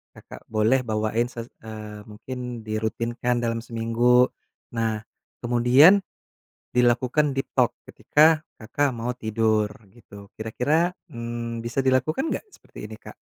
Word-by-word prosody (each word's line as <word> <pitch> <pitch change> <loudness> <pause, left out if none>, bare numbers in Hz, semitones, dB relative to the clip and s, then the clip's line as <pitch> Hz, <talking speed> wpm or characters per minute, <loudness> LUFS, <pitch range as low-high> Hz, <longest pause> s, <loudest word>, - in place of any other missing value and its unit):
Kakak - - -13
boleh 110 +4 +2
bawain 110 +2 0
se 120 -2 -7 0.2
eee, 105 -1 -9
mungkin 120 +2 -7
dirutinkan 115 +3 -2
dalam 115 -1 0
seminggu. 120 +2 +2 0.4
Nah, 110 -2 -1 0.4
kemudian 125 +10 +6 0.8
dilakukan 125 +4 +2
deep 135 - -3
talk - - +3
ketika 155 +1 +4
Kakak 135 +5 -1
mau 120 +2 -2
tidur, 110 -2 +1 0.2
gitu. 100 -2 -14
Kira-kira, 145 +10 +1 0.2
mmm, 115 0 -5
bisa 120 +3 -1
dilakukan 135 - +1
enggak - - -4
seperti - - -11
ini - - -9
Kak? - - -12
120 Hz, 120 wpm, -24 LUFS, 110-130 Hz, 0.8 s, kemudian